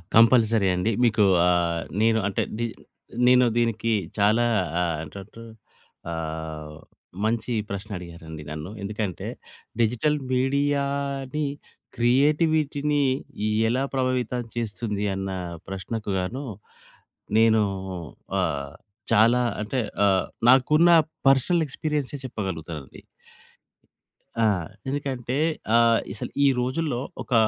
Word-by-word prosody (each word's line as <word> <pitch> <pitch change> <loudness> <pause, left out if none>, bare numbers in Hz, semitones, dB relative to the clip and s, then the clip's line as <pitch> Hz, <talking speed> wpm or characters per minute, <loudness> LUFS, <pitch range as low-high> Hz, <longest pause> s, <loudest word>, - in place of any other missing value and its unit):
Compulsory 115 -3 +5
అండి. 90 +5 0
మీకు 110 -2 +4 0.2
ఆహ్, 85 -1 +1 0.2
నేను 110 0 +4
అంటే 100 - 0 0.2
డి 120 - 0 0.6
నేను 125 0 +6
దీనికి 115 -1 +1 0.2
చాలా 105 +3 +4 0.4
ఆహ్, 80 -2 -1
టటు 100 +4 -10 0.7
ఆహ్, 80 -1 -5 0.5
మంచి 115 +2 0 0.2
ప్రశ్న 100 +2 -5
అడిగారండి 85 -3 -9
నన్ను. 75 +4 -6
ఎందుకంటే 100 -2 -4 0.5
డిజిటల్ 125 +7 +2 0.2
మీడియాని 140 +1 0 0.5
క్రియేటివిటీని 145 +3 +2 0.7
ఎలా 130 +3 +1
ప్రభావితం 125 -2 0
చేస్తుంది 105 -2 -3
అన్న 95 0 -3 0.4
ప్రశ్నకు 100 +3 -5
గాను 125 +10 -4 0.9
నేను 110 -1 +5 0.8
ఆహ్, 70 -1 -2 0.4
చాలా 115 +3 +5 0.2
అంటే 125 +5 -2 0.3
ఆహ్, 95 -2 +2 0.2
నాకున్న 150 +6 +5 0.4
పర్సనల్ 150 +6 +3
ఎక్స్‌పీరియన్సే 145 -1 -3
చెప్పగలుగుతానండి. 85 - -6 1.4
ఆ! 115 - +3 0.4
ఎందుకంటే, 130 -3 -3 0.4
ఆహ్, 115 -1 +5
అసలు 110 - -6
ఈ - - +6
రోజుల్లో 130 +1 -1 0.2
ఒక - - -6
115 Hz, 95 wpm, -25 LUFS, 95-135 Hz, 1.4 s, నేను